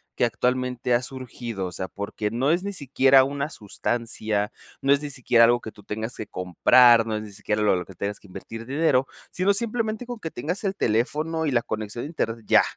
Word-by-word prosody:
que - - +2
actualmente 125 +1 0
ha 120 - +3
surgido. 120 -5 -6
O - - -7
sea, 95 +2 -4
porque 100 +1 -4
no 130 +6 +1
es 175 +3 +1
ni 200 0 -3
siquiera 135 -3 +4
una 140 +1 -2
sustancia, 110 -3 -2 0.3
no 135 - +2
es 140 - +1
ni 150 - -4
siquiera 120 -3 +4
algo 120 +1 +3
que 110 - -7
tú - - -16
tengas 110 +3 -4
que 110 - -6
comprar, 115 +6 +5
no 110 - -1
es 105 - -5
ni 105 - -10
siquiera 105 +1 -2
lo 105 -2 +4
lo 90 - -4
que 95 - -13
tengas 100 +3 -4
que - - -18
invertir 115 +4 -8
dinero, 135 -1 +2 0.2
sino 190 +2 +2
simplemente 225 +1 -2
con 245 -1 -6
que 165 - -5
tengas 165 - -3
el 195 0 0
teléfono 155 - 0
y 150 - 0
la 120 -2 +3
conexión 110 +2 -4
a - - -4
internet 115 -8 -3
ya. - - +6
120 Hz, 220 wpm, -25 LUFS, 110-145 Hz, 0.3 s, ya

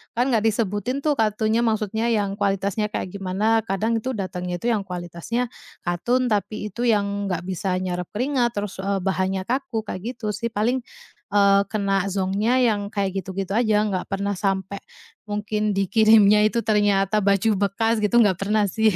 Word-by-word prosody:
kan 250 +3 +1
gak 225 -1 +2
disebutin 220 +5 -1
tuh 295 -4 +1
katunnya 220 +1 +1
maksudnya 220 0 0
yang 205 -3 0
kualitasnya 200 +1 0
kayak 190 -3 -4
gimana. 200 +4 +1
Kadang 220 +4 0
itu 260 +3 -3
datangnya 180 -3 -4
itu 235 +7 -1
yang 205 -3 -1
kualitasnya 180 +7 -4 0.3
katun, 240 +8 0
tapi 210 0 -2
itu 240 +4 -2
yang 200 -2 +1
nggak 175 -2 -2
bisa 185 0 -2
nyerap 180 -1 -3
keringat, 245 0 0
terus, 205 -2 -4
eee, 195 -1 -1
bahannya 190 0 0
kaku 235 0 -2
kayak 220 +4 -5
gitu 215 -2 -3
sih. 215 +3 -3
Paling, 235 +3 0 0.6
eee, 200 -1 +5
kena 195 -3 0
zonknya 200 +6 +1
yang 205 -3 +1
kayak 200 -2 -2
gitu-gitu 190 +1 -5
aja, 215 -3 +3
nggak 195 -4 -2
pernah 200 -1 -2
sampai, 195 0 -1 0.5
mungkin 210 0 -1
dikirimnya 210 +1 +5
itu 230 +1 -1
ternyata 205 -2 +2
baju 200 +1 +2
bekas 225 +3 +1
gitu, 210 +2 0
nggak 190 -4 +1
pernah 205 0 +1
sih. 220 -2 +2
205 Hz, 165 wpm, -23 LUFS, 195-225 Hz, 0.6 s, eee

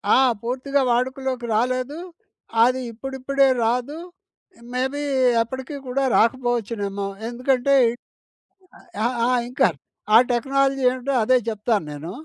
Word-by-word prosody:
ఆ! - - +5 0.2
పూర్తిగా 265 +4 -1
వాడుకలోకి 255 0 -1
రాలేదు, 255 +6 -1 0.6
అది 255 +2 +2
ఇప్పుడిప్పుడే 270 +3 0 0.2
రాదు, 250 +6 -1 0.8
మేబీ 265 +3 -2 0.4
ఎప్పటికి 260 +5 -5
కూడా 270 +2 -1
రాకపోవచ్చునేమో 230 -5 0 0.2
ఎందుకంటే 255 +2 +1 1.3
ఆహ్, 245 +1 0
ఆ! - - +1 0.2
ఇంకా 255 - +3 0.5
ఆ - - +11
టెక్నాలజీ 270 +2 +1
ఏంటో 255 +2 -3
అదే 255 +3 +4
చెప్తాను 215 -3 -1
నేను. 155 +4 -7
255 Hz, 105 wpm, -22 LUFS, 235-270 Hz, 1.3 s, ఆ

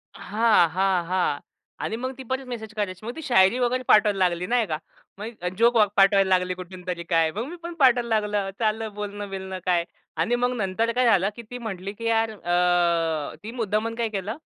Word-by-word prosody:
हां, 215 -5 +3
हां. 185 0 +1
हां. 180 -6 +1 0.4
आणि - - -2
मग 255 +2 -3
ती 265 - -8
परतच 260 +2 -3
मेसेज 225 -3 -7
करायची. 205 -2 -4
मग 240 - -5
ती 320 - -7
शायरी 235 -4 +4
वगैरे 250 +1 0
पाठवायला 210 -1 +5
लागली, 175 0 -3
नाही 240 -1 +2
का, 155 - -2 0.4
मग 210 +2 -5
अ, 180 - -2
जोक 235 +2 +4 0.2
पाठवायला 195 0 +5
लागली 180 0 -2
कुठून 180 0 -10
तरी 175 -1 -3
काय, 165 -1 +2
मग 215 +7 -4
मी 345 - -7
पण 340 0 -5
पाठवायला 250 -3 +4
लागलो. 205 -2 -2
चाललं 220 -1 -1
बोलणं-बिलणं 200 -2 -5
काय 175 -2 +2 0.3
आणि 175 +10 +1
मग 245 +1 0
नंतर 220 +2 0
काय 250 0 +3
झालं 195 -4 +4
की 235 - -8
ती 245 - -5
म्हटली 200 -4 -5
की 230 +2 -8
यार 225 0 +2
अ, 175 -5 +1
ती 220 - -6
मुद्दामन 225 -1 -1
काय 230 -1 -1
केलं, 210 +2 -4
210 Hz, 200 wpm, -25 LUFS, 185-230 Hz, 0.4 s, पाठवायला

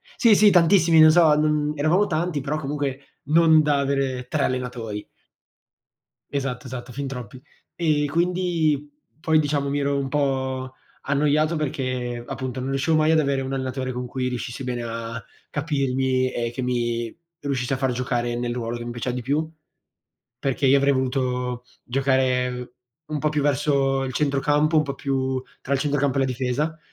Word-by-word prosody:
Sì, 225 -4 +5
sì, 210 +1 +6
tantissimi, 170 -2 +5
non 155 0 +9
so, 160 -2 +6
non 150 0 +1
eravamo 165 +8 +2
tanti, 160 -2 -1
però 150 +2 -2
comunque 140 -2 -3 0.2
non 160 -1 +6
da 145 -2 +2
avere 135 -2 -1
3 - - 0
allenatori. 125 -5 -3 1.3
Esatto, 135 -2 -3
esatto, 125 0 -7
fin 140 0 -4
troppi. 125 -1 -7 0.3
E, 155 -3 +1
quindi, 170 -3 0 0.3
poi, 160 -1 +3
diciamo 145 -2 0
mi 145 +1 0
ero 140 0 0
un 135 -1 -2
po' 130 -2 -1 0.3
annoiato 150 +3 +1
perché, 130 -5 -3
appunto, 130 -1 -4
non 130 +1 -3
riuscivo 135 +4 +1
mai 155 0 +3
ad 160 - +4
avere 140 -2 +1
un 130 0 -4
allenatore 130 -1 -3
con 125 0 -4
cui 125 0 -3
riuscissi 125 +1 -4
bene 120 -1 -3
a 115 0 -5 0.3
capirmi, 130 -3 0
e 120 -1 -2
che 130 - -5
mi 120 -2 -1 0.3
riuscisse 135 -3 -2
a - - 0
far 135 -1 0
giocare 120 -1 -1
nel 120 0 -2
ruolo 120 -1 -3
che 120 - -7
mi 120 - -4
piaceva 120 +1 -3
di 125 - -4
più, 150 +4 0 0.9
perché 135 0 0
io 135 +2 +6
avrei 140 +1 +3
voluto 125 -2 -1 0.2
giocare 125 -1 0 0.3
un 155 -1 -3
po' 150 +1 0
più 150 -2 0
verso 135 -1 +1
il 130 - -4
centrocampo, 150 +3 +1
un 155 - +4
po' 140 -1 -4
più 130 -1 -1 0.2
tra 140 - -5
il 135 - 0
centrocampo 145 -1 +1
e - - +3
la - - +3
difesa, 135 +5 -2
135 Hz, 170 wpm, -23 LUFS, 125-150 Hz, 1.3 s, non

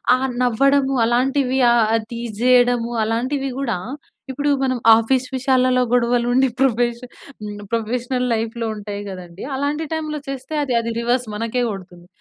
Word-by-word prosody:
ఆ - - -1 0.3
నవ్వడము 270 +3 +2
అలాంటివి 260 +2 +1
ఆహ్, 225 -1 +3
టీజ్ 235 0 -5
తీసేయడము 245 -1 +3
అలాంటివి 255 +5 -1
గూడా 260 -5 -1 0.6
ఇప్పుడు 290 +2 -1
మనం 255 -1 0 0.2
ఆఫీస్ 250 +3 +1
విషయాలలో 255 -1 +2
గొడవలు 245 0 +2
ఉండి 265 +1 +4
ప్రొఫెష 240 -2 +1 0.4
హ్మ్, 205 -1 -6
ప్రొఫెషనల్ 245 +3 -1
లైఫ్‌లో 230 +1 -2
ఉంటాయి 205 -1 -6
కదండీ. 180 -1 -9
అలాంటి 290 +3 -1
టైమ్‌లో 310 -1 -3
చేస్తే, 270 +2 -6
అది 260 -4 -2
అది 230 0 -3
రివర్స్ 245 +2 0
మనకే 230 +3 -2
కొడుతుంది. 180 -3 -10
245 Hz, 140 wpm, -20 LUFS, 230-265 Hz, 0.6 s, ఉండి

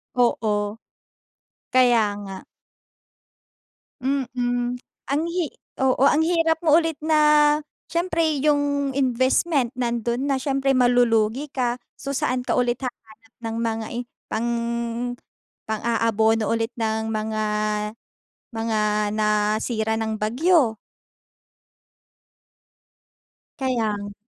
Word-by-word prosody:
Oo. 215 -3 +1 0.9
Kaya 245 -3 +5 0.2
nga. 195 -1 -7 1.7
Mm, 245 -2 -1 0.3
ang 280 +2 +1
hi 350 -2 0 0.3
oo, 265 0 +2
ang 295 +2 +5
hirap 325 -1 +2
mo 310 -2 +5
ulit 325 -2 +1
na 310 0 +2 0.7
siyempre 335 0 0 0.2
yung 285 -2 +1
investment 260 +1 +1
nando'n 240 +1 -1
na, 275 - +2
siyempre 270 0 0
malulugi 245 +1 +3
ka. 250 -3 -2 0.2
So, 275 - -5
saan 255 -2 -1
ka - - 0
ulit 245 +1 0
hahanap 225 -2 -9
ng 225 -1 -4
mga 225 -1 -1
i - - -2 0.3
pang 230 +2 -1 1.1
pang-aabono 225 0 +1
ulit 230 +1 -1
ng 220 -1 -1
mga 215 0 -2 1.1
mga 225 -1 -1 0.4
nasira 215 +1 +1
ng 220 -1 -2
bagyo? 250 +2 +3 2.8
Kaya 255 -5 0
nga. 205 0 -7
245 Hz, 95 wpm, -23 LUFS, 220-275 Hz, 2.8 s, Kaya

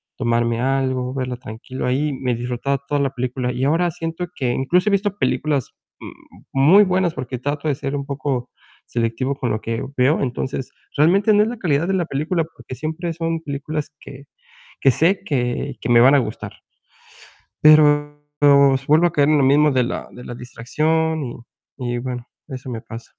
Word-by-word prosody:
tomarme 115 -1 0
algo, 130 -1 0
verla 130 -2 -3
tranquilo 125 +1 -7
ahí, 140 +3 0
me 125 -2 -2
disfrutaba 125 +3 -2
toda 145 0 0
la 140 - +1
película, 125 0 -2
y 125 +2 -1
ahora 170 +4 +2
siento 165 +2 -5
que 125 -2 -1
incluso 175 - +1
he - - 0
visto 200 0 0
películas 145 - 0 0.3
m - - -8 0.4
muy 155 +10 +6
buenas, 185 -2 +1
porque 125 -3 -5
trato 145 +3 -3
de 145 - +1
ser 140 0 -4
un 140 - -4
poco 140 -3 -3 0.4
selectivo 120 +4 -1
con 130 -3 -3
lo 110 - -1
que 115 +1 -3
veo, 130 +5 +3
entonces, 130 0 -3 0.2
realmente 190 +8 +4
no 210 0 +5
es 220 - -1
la 245 - -6
calidad 165 -6 +1
de 195 - 0
la 180 -2 0
película, 160 +3 -1
porque 155 -5 -11
siempre 160 +4 -4
son 165 0 -2
películas 150 0 -4
que 140 0 -11 0.6
que 135 - +5
sé 170 - +2
que 130 -2 -2
que - - -4
me 120 -1 +6
van 130 +4 +7
a - - +5
gustar. 125 - -5 1.0
Pero 145 -1 +5 0.7
vuelvo 160 +4 +5
a 170 - -1
caer 145 -1 +3
en 155 -1 +4
lo 135 - +3
mismo 145 +3 +4
de 130 -2 +2
la 120 - -4
de 125 - -12
la 120 - -7
distracción 155 +7 -1
y 120 -3 -6 0.6
y - - -1
bueno, 125 0 -5 0.2
eso 130 -2 -7
me 115 -2 -5
pasa. 115 +1 -10
140 Hz, 185 wpm, -21 LUFS, 125-160 Hz, 1.0 s, van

